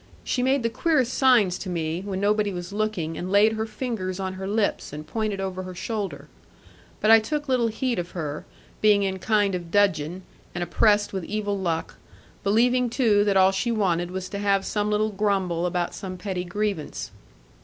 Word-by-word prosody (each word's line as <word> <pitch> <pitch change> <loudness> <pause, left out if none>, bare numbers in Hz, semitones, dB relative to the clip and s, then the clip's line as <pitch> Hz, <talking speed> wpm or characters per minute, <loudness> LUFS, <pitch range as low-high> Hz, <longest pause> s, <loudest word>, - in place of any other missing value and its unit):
She 250 - -1
made 265 0 +2
the 230 - +1
queerest 260 -3 +1
signs 230 -9 +4
to 190 - -5
me, 165 0 -2
when 195 -1 -4
nobody 205 0 +2
was 180 +1 -6
looking, 195 -7 -2
and 180 +1 -4
laid 210 +2 +5
her 220 0 -2
fingers 215 -5 -4
on 190 -1 -3
her 190 0 -6
lips, 210 +1 0
and 150 +1 -7
pointed 215 +3 -2
over 190 -1 -3
her 185 -1 -8
shoulder. 210 +1 -4 0.7
But 215 - +3
I 225 - +9
took 290 +7 -3
little 250 -3 +2
heed 235 0 -1
of 175 0 -4
her, 150 -2 -4 0.4
being 210 -1 +5
in 190 -1 -1
a - - -14
kind 205 0 +2
of 175 -2 -4
dudgeon, 185 -3 +1 0.3
and 175 - -1
oppressed 205 +3 +2
with 190 -2 -3
evil 205 -1 -2
luck; 170 -4 -2 0.5
believing 245 +4 +3
too 225 -4 +3
that 200 -2 +3
all 190 0 +6
she 195 +5 -1
wanted 175 -6 0
was 185 0 -4
to 200 - -5
have 200 -1 +1
some 210 0 -1
little 215 +1 +1
grumble 190 -4 0
about 175 -1 -1
some 185 -1 -6
petty 180 -1 -4
grievance. 200 -3 -3
200 Hz, 195 wpm, -25 LUFS, 185-215 Hz, 0.7 s, I